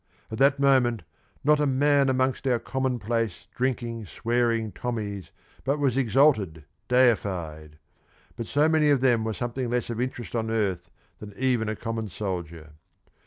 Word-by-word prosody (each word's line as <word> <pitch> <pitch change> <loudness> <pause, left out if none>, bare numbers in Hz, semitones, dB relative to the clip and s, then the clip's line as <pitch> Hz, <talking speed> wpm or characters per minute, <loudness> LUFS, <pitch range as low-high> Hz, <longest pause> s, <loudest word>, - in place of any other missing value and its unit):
At 110 - -5
that 140 +1 +4
moment 130 -6 +3 0.4
not 150 +1 +4
a 150 - +2
man 140 +1 +3
amongst 130 +1 0
our 125 -2 +3
common 130 +2 -2
place, 115 -3 -2
drinking, 120 -4 -2
swearing 115 0 0
Tommies 105 -3 -4 0.3
but 140 +2 0
was 140 -4 +1
exalted, 115 - +2 0.2
deified 90 -11 +1 0.6
but 115 - -5
so 145 +2 +3
many 155 -2 +3
of 140 -3 +3
them 120 -4 +3
were 110 0 -2
something 120 0 -3
less 120 0 -1
of 115 +1 -3
interest 125 -2 -4
on 110 -1 -1
earth 95 -6 -1 0.3
than 105 -1 -10
even 125 -4 +1
a 110 - -2
common 115 0 -4
soldier. 85 -5 -5
120 Hz, 155 wpm, -26 LUFS, 105-130 Hz, 0.6 s, that